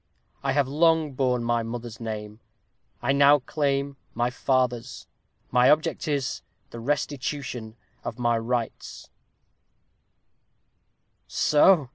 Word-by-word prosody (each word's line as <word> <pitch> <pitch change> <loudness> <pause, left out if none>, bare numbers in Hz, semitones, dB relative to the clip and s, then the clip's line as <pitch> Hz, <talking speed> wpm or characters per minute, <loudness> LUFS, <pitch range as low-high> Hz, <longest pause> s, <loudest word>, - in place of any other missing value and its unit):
I 135 -1 0
have 140 -1 +2
long 160 +1 +3
borne 125 -2 +1
my 120 0 +1
mother's 115 0 -6
name. 105 -2 -6 0.6
I 130 - +2
now 140 +1 +6
claim 140 0 -1 0.2
my 120 +2 0
father's. 125 -2 -1 0.5
My 125 +1 +5
object 155 +2 +2
is, 140 -3 -1 0.3
the 115 - -7
restitution 135 -3 -3 0.3
of - - -5
my 120 -1 +2
rights." 115 0 -4
125 Hz, 100 wpm, -26 LUFS, 120-140 Hz, 0.6 s, now